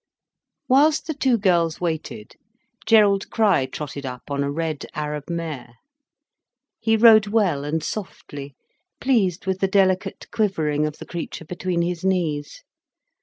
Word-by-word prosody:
Whilst 295 Hz, +4 st, +4 dB
the 315 Hz, -, -3 dB
two 265 Hz, -4 st, +2 dB
girls 170 Hz, -5 st, +1 dB
waited, 160 Hz, -10 st, -4 dB, 0.5 s
Gerald 205 Hz, -3 st, +4 dB
Crich 190 Hz, -, +2 dB
trotted 145 Hz, -2 st, -6 dB
up 125 Hz, +1 st, -8 dB
on 140 Hz, 0 st, 0 dB
a 140 Hz, -, -1 dB
red 155 Hz, -1 st, -3 dB
Arab 150 Hz, 0 st, -4 dB
mare. 160 Hz, -8 st, -5 dB, 1.0 s
He 225 Hz, 0 st, +2 dB
rode 215 Hz, -2 st, +7 dB
well 200 Hz, -10 st, +1 dB
and 150 Hz, +2 st, -2 dB
softly, 145 Hz, -8 st, -7 dB, 0.4 s
pleased 200 Hz, -10 st, +1 dB
with 190 Hz, 0 st, -1 dB
the 195 Hz, -, +2 dB
delicate 190 Hz, 0 st, +1 dB
quivering 155 Hz, -8 st, 0 dB
of 150 Hz, -, -7 dB
the -, -, -9 dB
creature 170 Hz, -1 st, -6 dB
between 175 Hz, +1 st, -2 dB
his 175 Hz, 0 st, -3 dB
knees. 180 Hz, -, -1 dB
175 Hz, 135 wpm, -23 LUFS, 150-205 Hz, 1.0 s, rode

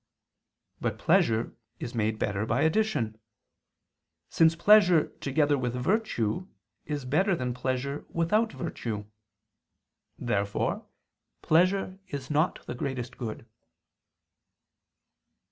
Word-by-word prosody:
But -, -, -2 dB
pleasure 115 Hz, 0 st, +2 dB, 0.2 s
is 120 Hz, -, -5 dB
made 110 Hz, -2 st, 0 dB
better 105 Hz, -1 st, -1 dB
by -, -, +1 dB
addition; 160 Hz, -, +1 dB, 1.1 s
since 165 Hz, 0 st, +4 dB
pleasure 180 Hz, -3 st, +5 dB
together 145 Hz, 0 st, +1 dB
with 125 Hz, -1 st, -2 dB
virtue 180 Hz, -, 0 dB, 0.4 s
is 145 Hz, -3 st, -4 dB
better 190 Hz, +9 st, +2 dB
than 125 Hz, -5 st, -2 dB
pleasure 130 Hz, +3 st, -2 dB
without 210 Hz, +7 st, +1 dB
virtue. 115 Hz, -, -4 dB, 1.1 s
Therefore 100 Hz, -3 st, -1 dB, 0.6 s
pleasure 185 Hz, +3 st, +2 dB
is 140 Hz, -1 st, -6 dB
not 155 Hz, +4 st, +1 dB
the -, -, -5 dB
greatest 125 Hz, 0 st, -4 dB
good. 115 Hz, -2 st, -6 dB
140 Hz, 95 wpm, -28 LUFS, 120-170 Hz, 1.1 s, pleasure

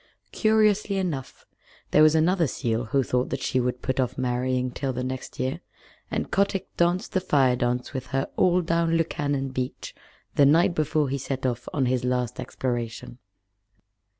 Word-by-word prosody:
Curiously 215 Hz, -2 st, +2 dB
enough, 165 Hz, -9 st, -4 dB, 0.5 s
there 150 Hz, -, +5 dB
was 155 Hz, 0 st, +6 dB
another 165 Hz, +1 st, +3 dB
seal 120 Hz, -2 st, -2 dB
who 135 Hz, +5 st, +1 dB
thought 125 Hz, 0 st, 0 dB
that 135 Hz, -1 st, -3 dB
she 130 Hz, -, +1 dB
would 125 Hz, 0 st, -2 dB
put 130 Hz, 0 st, -1 dB
off 125 Hz, -1 st, 0 dB
marrying 125 Hz, 0 st, 0 dB
till 135 Hz, +1 st, -3 dB
the 125 Hz, +1 st, -3 dB
next 130 Hz, 0 st, -6 dB
year, 130 Hz, +6 st, -1 dB, 0.5 s
and -, -, -3 dB
Kotick 200 Hz, -1 st, 0 dB
danced 175 Hz, +2 st, +1 dB
the 185 Hz, -, +1 dB
Fire 135 Hz, -8 st, +3 dB
dance 125 Hz, +1 st, -1 dB
with 130 Hz, -1 st, -4 dB
her 135 Hz, 0 st, -1 dB
all 180 Hz, 0 st, +3 dB
down 165 Hz, 0 st, +1 dB
Lukannon 145 Hz, -4 st, -1 dB
Beach 130 Hz, 0 st, -4 dB, 0.4 s
the 140 Hz, -, +5 dB
night 170 Hz, +5 st, +4 dB
before 155 Hz, -2 st, +1 dB
he 140 Hz, +1 st, -2 dB
set 130 Hz, 0 st, -4 dB
off 120 Hz, -1 st, -2 dB
on 135 Hz, -3 st, 0 dB
his 125 Hz, 0 st, 0 dB
last 125 Hz, -1 st, -1 dB
exploration. 120 Hz, -1 st, -4 dB
135 Hz, 170 wpm, -25 LUFS, 125-165 Hz, 0.5 s, was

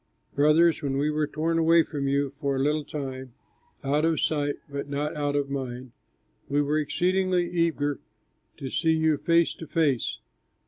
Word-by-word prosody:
Brothers, 155 Hz, +4 st, +4 dB
when 135 Hz, -2 st, -1 dB
we 150 Hz, +2 st, +1 dB
were 150 Hz, 0 st, 0 dB
torn 165 Hz, +3 st, -1 dB
away 165 Hz, 0 st, +5 dB
from 145 Hz, -3 st, -4 dB
you 140 Hz, 0 st, +1 dB
for 140 Hz, -1 st, -2 dB
a -, -, -1 dB
little 150 Hz, +2 st, +1 dB
time 130 Hz, -4 st, -6 dB, 0.5 s
(out 145 Hz, +3 st, +1 dB
of 165 Hz, -1 st, +2 dB
sight 145 Hz, -2 st, 0 dB
but 140 Hz, -1 st, -5 dB
not 145 Hz, +1 st, -2 dB
out 145 Hz, -1 st, -1 dB
of 140 Hz, -1 st, -1 dB
mind!), 130 Hz, -2 st, -5 dB, 0.6 s
we 145 Hz, +1 st, +1 dB
were 145 Hz, +1 st, +1 dB
exceedingly 180 Hz, +3 st, +1 dB
eager 165 Hz, -5 st, 0 dB, 0.6 s
to 135 Hz, -2 st, -6 dB
see 160 Hz, -2 st, +2 dB
you 160 Hz, -1 st, +2 dB
face 170 Hz, -1 st, +3 dB
to 160 Hz, -, -10 dB
face. 145 Hz, -8 st, 0 dB
145 Hz, 170 wpm, -26 LUFS, 140-160 Hz, 0.6 s, away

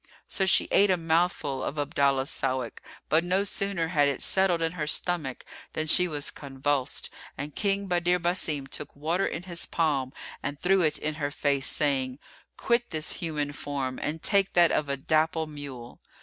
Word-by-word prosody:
So 190 Hz, -, +1 dB
she -, -, +4 dB
ate 200 Hz, 0 st, +5 dB
a 185 Hz, -, +3 dB
mouthful 165 Hz, -4 st, 0 dB
of 150 Hz, -, -4 dB
Abdallah's 140 Hz, -2 st, +1 dB
Sawik; 130 Hz, -3 st, -2 dB, 0.3 s
but 160 Hz, +2 st, +4 dB
no 185 Hz, +3 st, +1 dB
sooner 195 Hz, -4 st, -1 dB
had 145 Hz, -4 st, +3 dB
it 140 Hz, -2 st, -1 dB
settled 190 Hz, -3 st, +4 dB
in 165 Hz, -, 0 dB
her 160 Hz, -4 st, -4 dB
stomach 160 Hz, -5 st, -1 dB, 0.3 s
than 155 Hz, -, -1 dB
she 180 Hz, +3 st, +5 dB
was 150 Hz, -4 st, -4 dB
convulsed; 140 Hz, -1 st, -2 dB, 0.3 s
and 145 Hz, +1 st, -5 dB
King 200 Hz, -1 st, +1 dB
Badr 175 Hz, -1 st, +2 dB
Basim 170 Hz, -5 st, 0 dB
took 145 Hz, -, -7 dB
water 165 Hz, +6 st, 0 dB
in 165 Hz, -, -4 dB
his 175 Hz, -2 st, -4 dB
palm 145 Hz, -6 st, 0 dB, 0.3 s
and 145 Hz, +1 st, -4 dB
threw 190 Hz, +1 st, +3 dB
it 155 Hz, -2 st, +3 dB
in 155 Hz, 0 st, -2 dB
her 145 Hz, -, 0 dB
face, 140 Hz, -2 st, 0 dB
saying, 135 Hz, -3 st, 0 dB, 0.4 s
"Quit 240 Hz, 0 st, +1 dB
this 155 Hz, -1 st, -2 dB
human 150 Hz, -5 st, -2 dB
form 140 Hz, -3 st, -4 dB
and 155 Hz, +2 st, -3 dB
take 200 Hz, -2 st, +3 dB
that 175 Hz, -1 st, +5 dB
of 150 Hz, -2 st, 0 dB
a 140 Hz, -, -1 dB
dapple 160 Hz, +2 st, +1 dB
mule." 140 Hz, -5 st, -9 dB
155 Hz, 180 wpm, -27 LUFS, 140-175 Hz, 0.4 s, ate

